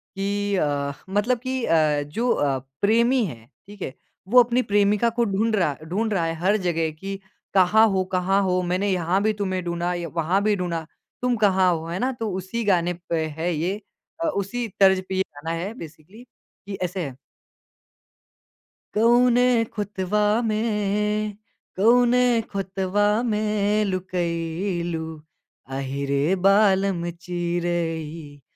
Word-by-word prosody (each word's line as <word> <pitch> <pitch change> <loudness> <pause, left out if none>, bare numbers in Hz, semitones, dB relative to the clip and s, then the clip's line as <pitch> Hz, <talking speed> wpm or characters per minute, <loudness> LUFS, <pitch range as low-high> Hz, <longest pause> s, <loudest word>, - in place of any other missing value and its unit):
कि 200 +1 -1
अ, 145 -4 0 0.2
मतलब 210 +5 +1
कि 260 0 -3
अ, 155 -3 +3
जो 225 +12 -2
अ, 140 -2 +1 0.2
प्रेमी 235 +4 +3
है, 115 -9 -8 0.2
ठीक 205 0 -13
है? 130 - -4 0.3
वो 245 +3 +7
अपनी 245 +2 +1
प्रेमिका 205 +3 +2
को - - +5
ढूँढ़ 215 +2 +1
रहा 170 -7 +1
ढूँढ़ 215 +6 -1
रहा 170 -4 +1
है 165 - -1
हर 200 +4 +2
जगह 165 -4 0
कि 195 +5 -7 0.3
कहाँ 210 +4 +5
हो 190 -1 +1
कहाँ 190 +2 +2
हो? 185 -1 +1
मैंने 185 +3 0
यहाँ 180 +2 +1
भी 215 0 +2
तुम्हें 190 -3 -2
ढूँढ़ा 175 +1 -1
या 175 -1 -4
वहाँ 170 +4 +1
भी 210 -1 +2
ढूँढ़ा। 170 -3 -3 0.4
तुम 250 -1 +1
कहाँ 190 -3 +3
हो 160 0 -4
है 175 +2 -3
ना? 260 +1 0
तो 225 -3 -4
उसी 205 +5 -4
गाने 175 -3 +2 0.2
पे 160 -2 0
है 170 +2 -1
ये 180 +7 -2 0.4
अ, - - +1
उसी 235 -1 -2
तर्ज 190 -1 +5
पे 190 - -2
ये 190 - +2
गाना 155 +3 -6
है 195 +6 -4
बेसिकली। 170 +4 -12 0.4
कि 200 - -5
ऐसे 180 0 -2
है 130 -2 -7 1.8
कौने 240 +2 +4 0.3
खुतवा 205 0 -1 0.2
में, 210 -1 0 0.4
कौने 245 +2 +4
खुतवा 195 +1 -1 0.2
में 210 -1 +1
लुकई 175 -1 -2
लू, 160 -1 -3 0.6
अहि 135 +1 -4
रे 140 +6 +1
बालम 195 -3 +3
चिरई, 170 -3 -3
190 Hz, 145 wpm, -24 LUFS, 170-210 Hz, 1.8 s, वो